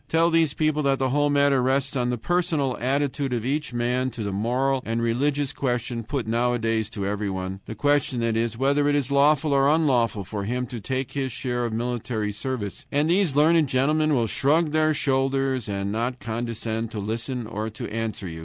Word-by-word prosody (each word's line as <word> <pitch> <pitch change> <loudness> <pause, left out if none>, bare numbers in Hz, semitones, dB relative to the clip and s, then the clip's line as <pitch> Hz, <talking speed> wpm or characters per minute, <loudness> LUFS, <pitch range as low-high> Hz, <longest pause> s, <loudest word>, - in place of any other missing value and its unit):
Tell 165 +1 +3
these 165 -3 +2
people 155 -1 +1
that 140 -2 +2
the 130 -1 0
whole 145 +1 +2
matter 140 -2 +3
rests 135 +2 0
on 125 -2 0
the 125 - -1
personal 155 -2 0
attitude 140 +1 0
of 115 -2 -2
each 150 +3 -1
man 125 +2 0
to 120 -3 -6
the 100 - -2
moral 125 +6 0
and 115 +1 -2
religious 135 +4 0
question 120 -2 -2
put 130 +2 -3
nowadays 115 -1 0
to 100 -3 -4
everyone, 95 -2 -3
the 110 - -6
question, 145 +1 +1
that 115 -1 0
is, 115 0 -1
whether 140 +3 +2
it 145 - +2
is 140 -2 0
lawful 145 +1 +3
or 135 0 +4
unlawful 125 -9 +2
for 100 +1 -5
him 125 +3 -1
to 120 -2 -7
take 130 +3 -3
his 135 -2 -2
share 120 -1 -2
of 115 - -3
military 115 -2 -2
service, 110 +2 -4
and 150 +3 +2
these 180 -6 +2
learned 155 +1 +4
gentlemen 150 +3 +2
will 120 -3 +2
shrug 150 +7 +2
their 155 0 +2
shoulders 135 -3 0
and 100 0 -2
not 120 +4 -2
condescend 115 -1 -3
to 110 - -5
listen 115 +4 -3
or 110 0 -4
to 110 - -6
answer 110 -3 -3
you. 80 -1 -7
130 Hz, 200 wpm, -24 LUFS, 115-145 Hz, -, or